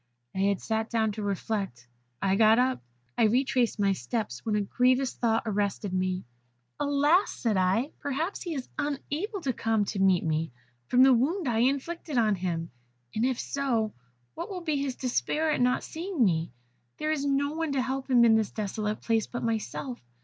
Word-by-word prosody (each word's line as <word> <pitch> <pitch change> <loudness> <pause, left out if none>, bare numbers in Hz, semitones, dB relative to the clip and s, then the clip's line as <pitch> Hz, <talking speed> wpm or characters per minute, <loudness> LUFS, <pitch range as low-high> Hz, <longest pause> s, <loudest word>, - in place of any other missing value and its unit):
I - - -4
had 200 0 +2
sat 220 0 -2
down 220 -2 +1
to 215 +1 -6
reflect. 195 - -3 0.4
I 195 0 +3
got 220 +2 +6
up. 255 +1 +2 0.4
I 230 - +6
retraced 250 +1 +2
my 200 -1 +2
steps, 205 - -4
when 220 -2 0
a 210 - +2
grievous 250 +5 +2
thought 225 -2 +1
arrested 205 -2 -1
me. 185 0 -1 0.5
'Alas!' 290 +6 +3
said 225 -4 0
I, 195 +9 +2
'perhaps 295 +7 -2
he 340 -3 -4
is 260 -3 -4
unable 300 - -3
to 270 -5 -1
come 225 -3 +1
to 200 - -4
meet 190 -2 +4
me, 160 -1 -1 0.4
from 250 +1 +5
the 265 0 +7
wound 300 +8 +1
I 225 -2 +1
inflicted 280 +4 0
on 220 -3 +4
him; 175 -3 -3 0.4
and 220 - 0
if 255 -1 +1
so, 240 -6 -1 0.4
what - - -6
will 370 -3 -5
be 310 -4 0
his 275 -2 -2
despair 300 +5 0
at 295 - 0
not 250 0 +2
seeing 330 - -1
me? 165 - 0 0.5
There 305 0 -1
is 300 -3 -1
no 285 0 +1
one 320 -2 -2
to 270 - +1
help 265 +1 -3
him 240 -2 +6
in 225 - +6
this 220 -2 +2
desolate 210 0 -3
place 225 -2 +1
but 240 - -5
myself. 230 +3 -3
235 Hz, 185 wpm, -28 LUFS, 205-280 Hz, 0.5 s, the